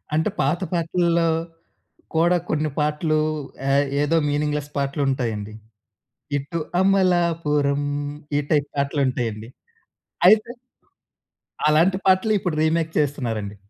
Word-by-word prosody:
అంటే, 160 +1 +1
పాత 150 +6 +1
పాటల్లో 170 0 +1 0.9
కూడా 170 +2 +4
కొన్ని 155 0 0
పాటలు 150 +1 +1 0.5
ఏహ్, 140 +1 +3 0.2
ఏదో 145 +3 +1
మీనింగ్‌లెస్ 150 0 -1
పాటలుంటాయండి. 130 -7 -1 0.9
ఇటు 140 +5 -5 0.2
అమలాపురం 170 -7 +2 0.5
ఈ - - +3
టైప్ 145 -2 +2
పాటలుంటాయండి. 125 -6 -1 0.8
అయితే... 215 +3 +4 1.2
అలాంటి 165 +5 +3
పాటలే 190 +3 +3
ఇప్పుడు 180 -4 -2
రీమేక్ 160 0 +1
చేస్తున్నారండి. 115 -8 -2
150 Hz, 90 wpm, -22 LUFS, 140-170 Hz, 1.2 s, కూడా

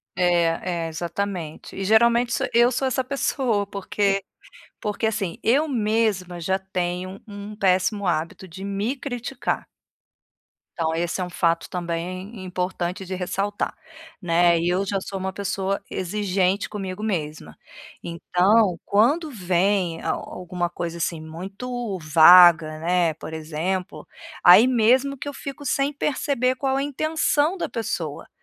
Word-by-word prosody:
É, 170 -1 +1
é, - - -2
exatamente. 170 0 -5
E 195 - -4
geralmente 235 +3 +4
sou - - 0
eu 240 +2 +5
sou 265 +2 0
essa 260 0 0
pessoa 250 -5 0
porque 200 0 -1 0.6
porque, 210 +2 -2
assim, 200 -6 -3
eu 275 +7 +3
mesma 215 - 0
já 190 +3 0
tenho 185 0 -4
um 205 0 -8
péssimo 190 +1 +1
hábito 170 +3 -2
de 185 +3 -10
me 200 +5 -2
criticar. 255 -1 -4 1.1
Então 160 -1 +1
esse 170 +3 -2
é - - 0
um 180 - -5
fato 170 -1 0
também 185 +4 -4
importante 180 0 -3
de 185 0 -5
ressaltar, 195 +3 -2 0.5
né, 170 -1 +3
e 170 - 0
eu 185 +2 +1
já 195 0 -1
sou 195 0 -5
uma 190 0 -3
pessoa 195 0 -2
exigente 190 0 0
comigo 195 -2 -5
mesma. 160 -8 -4 0.5
Então 180 +3 +2
quando 285 +10 +2
vem 185 -3 0
a - - 0
alguma 180 -1 -4
coisa, 170 -1 -5
assim, 165 0 -1
muito 195 +7 -5
vaga, 160 0 +7
né, 170 -1 +1
por 160 0 -9
exemplo, 165 +4 -4 0.4
aí 205 +8 +9
mesmo 255 +3 +3
que 285 - -7
eu 285 - -4
fico 280 +1 -8
sem 275 +2 +1
perceber 270 -3 0
qual 265 0 -1
a 275 - 0
intenção 310 +3 +1
da - - -2
pessoa, 170 -9 -4
190 Hz, 140 wpm, -23 LUFS, 175-225 Hz, 1.1 s, aí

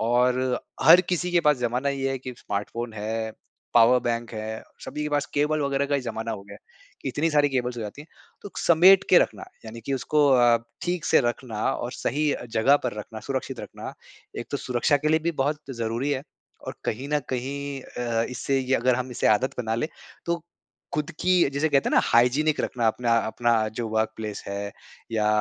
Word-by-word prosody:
और 125 +2 +2 0.2
हर 165 +6 +9
किसी 180 0 0
के 175 - +4
पास 150 -3 +4
जमाना 125 +3 -1
ये 135 -1 -1
है 135 - -2
कि 130 0 -7
स्मार्टफोन 110 +3 -4
है, 110 +1 -3 0.4
पावर 120 +2 +6
बैंक 120 0 -2
है, 110 +1 -5 0.2
सभी 150 - -5
के 150 - -2
पास 145 -1 0
केबल 150 +1 +1
वगैरह 140 0 0
का 145 - 0
ही 140 - +1
जमाना 115 -2 -4
हो 100 -3 -5
गया 100 - -12
है। - - -12
इतनी 160 +2 0
सारी 145 -1 +4
केबल्स 125 -2 -2
हो 120 - -4
जाती 105 +7 -7
है - - -17 0.4
तो 205 - -8
समेट 185 +4 +6
के 180 - +9
रखना - - -1 0.2
यानी 115 +1 -8
कि 135 - -4
उसको 145 +3 +2
अ, 120 -2 +5 0.3
ठीक 175 -2 -2
से - - +4
रखना 120 -3 -3
और 120 +1 -4
सही 150 +4 0
अ, - - -5
जगह 115 +5 +4
पर 125 - -1
रखना 110 +1 -7
सुरक्षित 135 -1 -4
रखना - - -8 0.5
एक - - -5
तो - - -1
सुरक्षा 125 +4 +1
के 150 +2 -1
लिए 160 +1 +4
भी - - 0
बहुत 150 +2 -1 0.2
ज़रूरी 115 +5 -1
है। 135 -2 -1 0.4
और - - -5
कहीं 130 +6 -3
न 150 - +4
कहीं 140 +2 -3
अ, 120 -3 -2
इससे 135 +2 -1
ये 130 0 0
अगर 125 +1 +3
हम 130 +1 -3
इसे 120 - -1
आदत 125 +5 +2
बना 110 -2 -1
ले 120 +7 -1 0.4
तो 170 -1 -1 0.5
खुद 150 +2 -1
की 180 -5 +4
जिसे 140 +3 0
कहते 140 -2 +2
हैं - - 0
ना - - +6
हाइजीनिक 135 +6 +3
रखना 120 -2 -1
अपना 115 +1 +2
अपना 120 +1 +1 0.3
जो 120 - -1
वर्क 110 0 +1
प्लेस 105 -2 -5
है। 100 0 -4 0.4
या 105 -1 +1
125 Hz, 210 wpm, -25 LUFS, 115-145 Hz, 0.5 s, हर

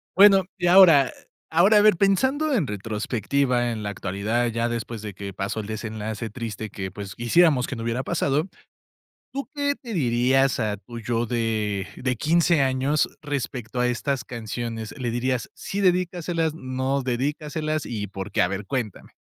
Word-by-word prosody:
Bueno, 195 -1 +7
y 175 - -2
ahora 170 -8 +7 0.4
ahora, 190 +6 +5
a - - +7
ver, 215 -3 +6
pensando 260 - +2
en 180 - +2
retrospectiva, 120 +4 -1
en 110 -2 -4
la 100 - -2
actualidad, 105 +5 -1
ya 115 +1 -1
después 115 -2 -4
de 105 -2 -6
que 100 +1 -7
pasó 95 +3 -3
el 105 - -5
desenlace 110 0 -5
triste 110 -3 -6
que, 95 -1 -5
pues, 100 -1 -8
quisiéramos 130 +2 +3
que - - -4
no 115 - -5
hubiera 115 +2 -1
pasado, 155 +2 0 0.8
¿tú 275 -3 -4
qué 285 0 0
te 235 -4 -8
dirías 130 - +2
a 105 -2 -1
tu 120 +2 -9
yo 115 +1 -1
de 110 -4 -1
de 125 -1 -1
15 165 +2 +3
años 135 +3 +1
respecto 130 -5 -4
a 125 0 +2
estas 125 0 -1
canciones? 115 0 -5
¿Le 120 -2 -2
dirías: 120 0 -1
"Sí, 200 - -4
dedícaselas" 175 -3 +1
o - - -10
"No, 130 0 -2
no - - -2
dedícaselas" 150 +4 -2
y 105 -4 -4
por 95 0 -7
qué? - - +1
A 90 - +4
ver, 100 +1 -4
cuéntame. 120 -3 -4
125 Hz, 175 wpm, -24 LUFS, 110-155 Hz, 0.8 s, Bueno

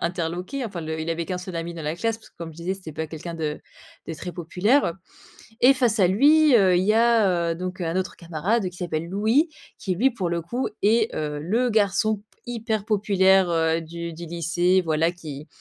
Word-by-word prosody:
interloqués, 175 +9 -3
enfin 195 -6 -5
le 160 0 -4
il 160 +1 -3
avait 165 0 -2
qu'un 185 - -3
seul 180 0 -7
ami 170 +1 -4
dans 165 - -7
la 150 +1 -2
classe 225 +6 -1
parce 225 - -19
que, - - -46
comme 170 -1 -6
je 155 - -17
disais, 170 +2 -3
c'était 185 -5 -9
pas 160 +1 -4
quelqu'un 165 +2 -7
de 155 -2 -3 0.5
de 165 - -3
très 180 +3 -7
populaire, 185 - +1
heu. 170 - -1 0.7
Et 260 +3 +7
face 240 -4 +1
à 190 - +6
lui, 290 - +5
heu, 190 -5 +5
il 180 - +2
y 210 +3 +3
a 210 -7 +3
heu, - - -8
donc 185 +1 -5
un 165 +1 -2
autre 185 0 -2
camarade, 180 +5 -1
qui 180 - -15
s'appelle 170 -2 -3
Louis, 220 - +2 0.3
qui 185 -3 -2
lui 260 +8 +3
pour 190 -8 -3
le 170 0 -1
coup 245 +10 -2 0.2
est 225 +2 +3
heu, 150 -1 -3
le 230 +11 0
garçon 215 0 +2
p 205 - -18 0.2
hyper 225 -3 -3
populaire, 195 -3 +3
heu, 165 0 +1
du 170 +1 -6
du 170 +1 -8
lycée, 170 +3 +1
voilà 160 +1 +2
qui 155 -4 -9
180 Hz, 225 wpm, -24 LUFS, 165-215 Hz, 0.7 s, Et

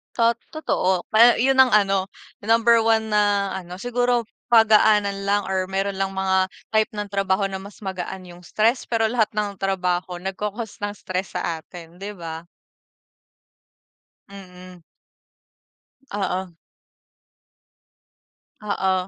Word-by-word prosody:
Tot 230 0 +3 0.2
totoo. 190 - 0
Pa 230 +2 +6
yun 265 +1 +3
ang 260 -4 +6
ano, 195 -2 +3 0.4
number 230 +1 +4
1 220 -1 +2
na 205 -1 +2
ano 180 0 -9
siguro 245 0 +1 0.3
pagaanan 210 -3 +4
lang 205 +1 +2
or 190 -1 0
meron 195 +1 -2
lang 195 0 -2
mga 190 0 +1 0.2
type 220 -1 +1
ng 205 -1 -5
trabaho 195 0 0
na 190 - -4
mas 200 +2 -12
magaan 190 -1 -5
yung 175 -1 -14
stress 230 +7 +1
pero 225 -2 +1
lahat 225 -2 0
ng 205 -2 -2
trabaho, 180 -2 -2
nag-ca-cause 210 +3 -5
ng 205 - -4
stress 185 -1 -5
sa 170 -2 -2
atin, 170 -1 -12
'di 200 +2 -7
ba? 165 -2 -8 1.8
Mhm. 185 -2 -13 1.3
Oo. 190 -2 -3 2.1
Oo. 195 -2 0
200 Hz, 125 wpm, -23 LUFS, 185-220 Hz, 2.1 s, Pa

